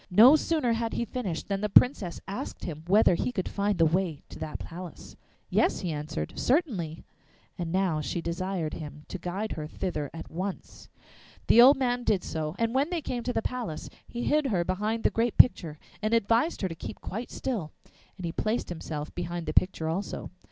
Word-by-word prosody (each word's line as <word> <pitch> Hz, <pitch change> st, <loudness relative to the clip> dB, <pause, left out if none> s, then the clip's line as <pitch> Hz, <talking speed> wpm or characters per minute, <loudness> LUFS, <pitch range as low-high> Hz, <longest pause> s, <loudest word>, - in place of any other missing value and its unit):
No 230 Hz, +10 st, +8 dB
sooner 310 Hz, -6 st, +1 dB
had 230 Hz, 0 st, -1 dB
he 235 Hz, -, -1 dB
finished 200 Hz, -8 st, -4 dB
than 195 Hz, -1 st, -1 dB
the 210 Hz, -, 0 dB
Princess 200 Hz, -5 st, +4 dB
asked 200 Hz, -, -5 dB
him 155 Hz, -2 st, -5 dB
whether 200 Hz, 0 st, +5 dB
he 210 Hz, -, 0 dB
could 185 Hz, -6 st, -2 dB
find 200 Hz, -1 st, 0 dB
the 165 Hz, -, +5 dB
way 165 Hz, -2 st, 0 dB
to -, -, -10 dB
that 155 Hz, -, -4 dB
palace. 175 Hz, 0 st, -9 dB, 0.4 s
'Yes,' -, -, +2 dB
he 175 Hz, -, -2 dB
answered, 150 Hz, -, -4 dB
'certainly.' 220 Hz, -, 0 dB, 0.5 s
And 170 Hz, -2 st, -4 dB
now 180 Hz, -4 st, +1 dB
she 160 Hz, -, -2 dB
desired 170 Hz, -1 st, -2 dB
him 150 Hz, -1 st, -7 dB
to 190 Hz, -, -5 dB
guide 190 Hz, +5 st, -3 dB
her 150 Hz, -1 st, -4 dB
thither 150 Hz, -4 st, -3 dB
at 165 Hz, -, -9 dB
once. 185 Hz, +3 st, -6 dB, 0.6 s
The 235 Hz, -, +7 dB
old 265 Hz, +4 st, +8 dB
man 245 Hz, -2 st, 0 dB
did 200 Hz, -5 st, +2 dB
so, 155 Hz, 0 st, -3 dB
and 230 Hz, 0 st, 0 dB
when 275 Hz, +4 st, +2 dB
they 345 Hz, -4 st, -2 dB
came 245 Hz, -2 st, -3 dB
to 245 Hz, -, -2 dB
the 225 Hz, -, 0 dB
palace 240 Hz, -11 st, -4 dB, 0.2 s
he 240 Hz, 0 st, -5 dB
hid 300 Hz, +1 st, +2 dB
her 190 Hz, -8 st, +1 dB
behind 210 Hz, +5 st, -1 dB
the -, -, +3 dB
great 230 Hz, 0 st, 0 dB
picture 165 Hz, -11 st, +5 dB, 0.2 s
and 215 Hz, +2 st, +2 dB
advised 230 Hz, +8 st, +2 dB
her -, -, +2 dB
to 170 Hz, -, -5 dB
keep 160 Hz, -, -8 dB
quite 225 Hz, +6 st, -5 dB
still, 215 Hz, -, -3 dB, 0.5 s
and 185 Hz, -, -5 dB
he 165 Hz, -, -2 dB
placed 215 Hz, +7 st, -1 dB
himself 155 Hz, -3 st, -5 dB
behind 175 Hz, -1 st, -4 dB
the -, -, -3 dB
picture 180 Hz, -3 st, +2 dB
also. 175 Hz, +5 st, -3 dB
190 Hz, 200 wpm, -28 LUFS, 165-235 Hz, 0.6 s, No